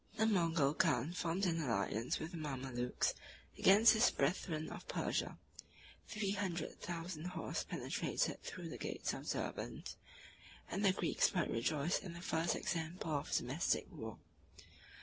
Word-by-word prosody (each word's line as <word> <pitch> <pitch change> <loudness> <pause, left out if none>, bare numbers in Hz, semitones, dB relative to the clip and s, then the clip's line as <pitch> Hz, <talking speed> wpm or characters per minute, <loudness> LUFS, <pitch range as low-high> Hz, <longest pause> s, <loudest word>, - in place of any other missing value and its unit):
The 220 - +4
Mogul 165 -8 +3
khan 155 -1 +2
formed 180 +2 0
an 165 -2 +1
alliance 115 -2 0
with 160 - -4
the 175 - -6
Mamalukes 130 -5 -1 0.4
against 215 +3 +7
his 220 +3 +5
brethren 155 +2 0
of - - -8
Persia: - - -1 0.7
three 210 -2 -1
hundred 190 -4 -2
thousand 170 -1 -4
horse 180 -2 -2
penetrated - - -1
through - - -6
the - - -7
gates - - -2
of - - -6
Derbend; - - -3 0.8
and 200 - -1
the 195 - +6
Greeks 190 - +2
might 170 - +1
rejoice 145 +8 +1
in 180 - -7
the 170 - -8
first 165 -1 +1
example 165 0 -2
of 145 -1 -1
domestic 145 +9 +1
war. 110 - -6
165 Hz, 145 wpm, -37 LUFS, 145-185 Hz, 0.8 s, against